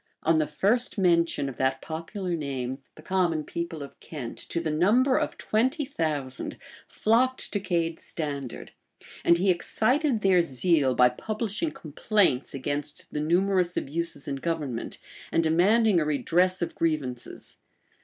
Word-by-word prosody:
[*] - - -35
On 160 0 +3
the 155 - +1
first 235 +4 +1
mention 170 -6 +2
of 135 - -7
that 130 0 +1
popular 170 +4 -4
name, 135 -4 -4 0.2
the 155 - -14
common 175 -5 +1
people 165 -1 -5
of 140 - -12
Kent, 130 -7 -7
to 170 - -1
the 160 -2 -2
number 225 - +3
of - - -3
twenty 260 +8 0
thousand, 150 - -3 0.3
flocked 255 +4 +1
to 205 - +1
Cade's 170 -4 -1
standard; 140 -6 -5 0.5
and 170 - +5
he 190 +2 +3
excited 235 - +1
their 190 -3 +5
zeal 140 -2 +2
by 125 0 +6
publishing 215 - -3
complaints 155 - 0
against 145 +2 -4
the 150 - -1
numerous 180 +2 +2
abuses 165 0 -3
in 140 - -2
government, 145 -6 -3 0.3
and 165 - +2
demanding 190 +5 +4
a 155 - 0
redress 175 +6 +1
of 170 - -4
grievances. 145 -7 -3
170 Hz, 145 wpm, -27 LUFS, 145-195 Hz, 0.5 s, by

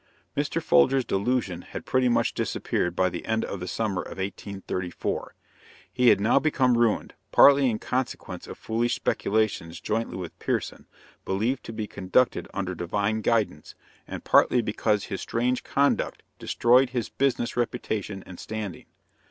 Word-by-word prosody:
Mr. - - 0
Folger's 120 - +4
delusion 100 -3 -1
had - - -8
pretty 130 -1 +2
much 120 - +2
disappeared 90 0 -1
by 95 0 +3
the 85 -1 -5
end 110 0 0
of 100 - -5
the 90 - -5
summer 100 -1 -1
of - - -9
1834. 95 -2 -4 0.6
He 125 -1 +3
had - - +5
now 110 +6 +4
become 130 -5 +2
ruined, 115 -2 +1 0.2
partly 140 -2 +7
in 110 - -1
consequence 125 +3 -4
of - - -8
foolish 115 +1 0
speculations 100 -6 -1
jointly 115 -1 -2
with 90 -3 -7
Pierson, - - -3 0.4
believed 115 +7 -1
to - - -6
be 110 -1 -4
conducted 100 +5 +1
under 95 -2 -3
Divine 100 +5 -1
guidance, 105 -10 0 0.3
and - - -6
partly 125 -2 +4
because 105 -1 0
his 95 - -5
strange 125 +2 -1
conduct 140 +1 0 0.2
destroyed 125 +2 +3
his 125 -3 -3
business 135 -3 0
reputation 105 -4 -2
and 90 - -11
standing. 110 -4 -6
110 Hz, 150 wpm, -26 LUFS, 95-120 Hz, 0.6 s, partly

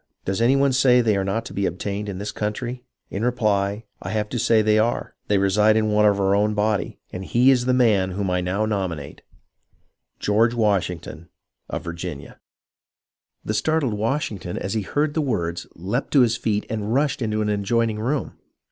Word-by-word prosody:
Does 95 +3 -1
any 125 +4 +4
one 140 -1 +3
say 125 -1 +5
they 110 -4 +2
are 100 - 0
not 100 +4 -2
to - - -8
be 100 -1 0
obtained 100 +4 -4
in 95 - -5
this 105 +2 -4
country 120 +4 -4 0.3
1 - - -5
In 105 - -2
reply, 105 -4 0 0.2
I - - -5
have 105 -1 -1
to 120 - -3
say 110 0 +3
they 110 0 +3
are; 115 +2 0
they 105 - +2
reside 105 +3 +3
in 110 -1 +1
one 105 0 +4
of 100 -1 +2
our 95 0 +2
own 105 +1 +2
body, 105 -1 0 0.2
and 90 - -5
he 125 +7 +4
is 125 -2 +2
the 130 - +2
man 105 -7 +3
whom 100 +1 -2
I 90 0 +1
now 95 +4 0
nominate, 90 -9 -3 0.5
— - - -44
George 115 +3 +3
Washington 90 -6 -1 0.4
of 80 - -4
Virginia. 85 -4 -7 1.1
The - - -1
startled 155 -7 +1
Washington 105 - -2
as 95 - -3
he 110 - 0
heard 145 +9 -1
the 160 - 0
words 85 - -2
leaped 105 - -3
to 140 - +6
his 120 -1 +3
feet 105 -3 -1
and 110 0 -2
rushed 140 -1 +1
into 110 -2 0
an 105 - -1
adjoining 105 +2 0
room. 135 +6 -2
105 Hz, 200 wpm, -23 LUFS, 100-120 Hz, 1.1 s, to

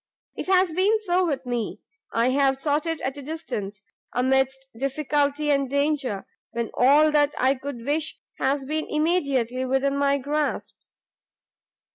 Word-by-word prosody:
It - - -5
has 370 -3 +3
been 400 +6 +3
so 365 -2 +1
with 275 -4 -2
me; 240 -3 -3 0.3
I 230 +2 +2
have 270 0 +2
sought 295 +3 0
it 325 -1 -2
at 270 +2 -3
a - - -7
distance, 215 -10 -5 0.3
amidst 265 +1 +1
difficulty 285 +3 0
and 275 -2 +1
danger, 280 -7 0 0.3
when 235 -1 -2
all 290 +5 +5
that 295 -1 +2
I 260 +2 +3
could 265 -3 -7
wish 305 +3 -1 0.2
has 270 +1 0
been 310 +3 -2
immediately 280 -6 +1
within 270 +2 +1
my 280 0 +2
grasp." 295 +2 -2
280 Hz, 145 wpm, -25 LUFS, 260-305 Hz, 0.3 s, all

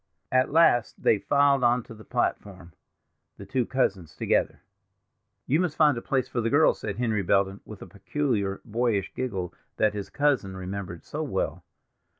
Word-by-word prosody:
At 130 +1 +3
last 155 -7 +3
they 105 - +4
filed 140 +2 +3
on 120 0 +3
to - - -12
the 110 -1 -13
platform—the 95 0 -6
two 125 +2 -1
cousins 95 - -1
together. - - 0 0.8
"You 150 +5 +2
must 180 -4 0
find 150 -4 +5
a 115 - -4
place 130 0 -1
for 120 - -2
the 115 - 0
girls," 145 +4 +4
said 100 - -4
Henry 110 -2 0
Belden, 100 +1 +1
with 105 -2 -11
the - - -7
peculiar 100 0 -2
boyish 115 -3 -1
giggle 95 -9 -3 0.2
that 110 -1 +2
his 100 -2 -5
cousin 135 -10 0
remembered 95 -2 -6
so - - -5
well. - - -2
110 Hz, 160 wpm, -26 LUFS, 100-130 Hz, 0.8 s, find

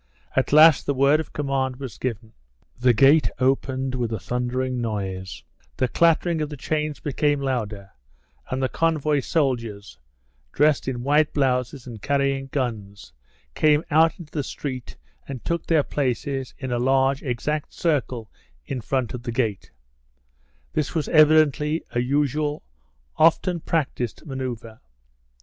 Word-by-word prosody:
At 130 - +1
last 155 0 +7
the 140 - +1
word 140 +3 +4
of 160 - -5
command 135 -3 -1
was 130 -5 -8
given. 115 -3 -4 0.5
The 125 0 +5
gate 140 +6 +5
opened 130 0 0
with 120 -3 -2
a 110 - -1
thundering 125 +2 -2
noise, 95 -5 -4 0.3
the 130 - +2
clattering 165 +3 +2
of 150 - -2
the 150 - -7
chains 150 +1 -2
became 145 0 0
louder, 110 -7 -3 0.6
and 130 +1 -2
the - - +3
convoy 155 -1 +1
soldiers, 115 - -2 0.5
dressed 150 -1 +2
in 120 -2 -3
white 150 +3 +2
blouses 130 -1 0
and 115 -5 -9
carrying 140 +1 0
guns, 110 -8 -4 0.4
came 150 - +3
out 160 +2 +4
into 165 -4 -12
the 150 - -2
street 130 -2 -6 0.3
and 135 -4 -7
took 170 0 -2
their 160 -3 +3
places 135 -1 -2
in 130 -2 -5
a 120 - 0
large, 135 +2 +2
exact 145 +4 -3
circle 130 - -1 0.3
in 130 -2 -4
front 130 0 -1
of 125 - -5
the 120 - -4
gate; 115 -5 -2 1.0
this 155 0 -2
was 155 -3 -1
evidently 155 0 +4
a 120 - -1
usual, 145 +3 0 0.5
often 170 +2 +3
practised 140 -8 -2
manoeuvre. 125 -5 -6
135 Hz, 140 wpm, -24 LUFS, 125-150 Hz, 1.0 s, last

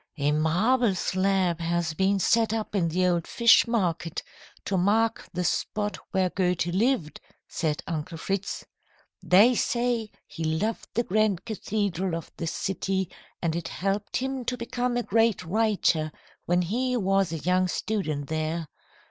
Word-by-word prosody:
"A 145 0 +1
marble 190 +9 +2
slab 185 -2 +1
has 170 -1 -1
been 190 +4 +2
set 225 +3 +2
up 220 -2 -3
in 185 -5 +2
the 180 +3 +1
old 175 -2 +1
Fish 235 -1 +5
Market 175 -8 -1 0.4
to 200 - -1
mark 210 +5 +1
the 180 +1 -2
spot 210 +3 -1
where 185 -2 +1
Goethe 180 -3 +1
lived," 185 - 0 0.3
said 155 -3 -2
Uncle 165 +1 -4
Fritz. 195 +4 -3 0.6
"They 205 +7 +6
say 235 -2 0 0.2
he 165 - -7
loved 160 +8 -1
the 235 - +2
grand 215 -3 +1
cathedral 200 -5 -2
of 165 - -7
the 165 - -3
city, 190 +1 -2 0.3
and 165 -1 0
it 170 -1 -3
helped 200 +2 -2
him 265 0 -2
to 250 +1 -1
become 245 +1 -2
a 245 - 0
great 225 -4 +2
writer 185 -5 +1 0.4
when 175 +1 +3
he 250 +7 0
was 195 -4 +1
a 165 - -2
young 180 +3 +1
student 175 -7 -2
there. 160 +1 -2
190 Hz, 150 wpm, -26 LUFS, 170-220 Hz, 0.6 s, They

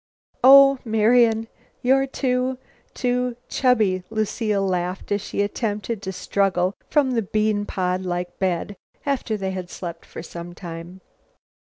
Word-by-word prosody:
"Oh, 275 +1 +8
Marian, 225 0 +3 0.4
you're 270 +2 +3
too 255 -1 -1 0.4
too 250 -1 0
chubby!" 215 -8 +2
Lucile 215 -2 -1
laughed, 180 0 -2
as 205 0 +1
she 205 - -2
attempted 210 +1 -3
to 190 -1 -4
struggle 185 0 0 0.2
from 285 -4 +3
the 235 -2 +1
bean 210 0 0
pod 185 0 -1
like 175 -1 -4
bed, 190 +1 -1 0.3
after 265 -6 -1
they 190 -1 -3
had 185 -2 -5
slept 175 -3 -7
for - - -9
some 175 0 -8
time. 175 +1 -9
205 Hz, 135 wpm, -23 LUFS, 185-245 Hz, 0.4 s, Oh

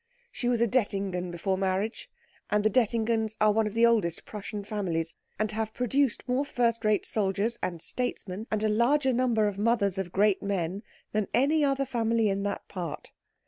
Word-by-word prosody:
She 245 - -3
was 240 -2 +1
a 235 - +4
Dettingen 195 -6 -1
before 180 +2 -1
her - - -5
marriage, 195 +4 -1 0.4
and 210 0 +2
the 215 - +3
Dettingens 225 -1 +1
are 215 0 +5
one 220 +1 +2
of 210 - -6
the 230 +1 +5
oldest 215 -8 +1
Prussian 210 0 -6
families, 175 -6 -2 0.2
and 215 +1 0
have 220 0 -3
produced 255 +1 0
more 255 +2 +1
first 235 -5 0
rate 215 -1 +2
soldiers 210 +3 0
and 170 -3 -3
statesmen 220 -4 -2
and 215 0 -1
a - - +3
larger 260 +5 +3
number 235 -4 +2
of 200 -1 -4
mothers 205 -4 +2
of 180 -2 -3
great 200 +1 +3
men 195 -1 -2 0.3
than 215 -2 0
any 290 +5 +3
other 275 -1 +1
family 230 -3 +1
in 195 0 -1
that 200 0 -3
part. 175 -5 -6
215 Hz, 185 wpm, -28 LUFS, 195-235 Hz, 0.4 s, are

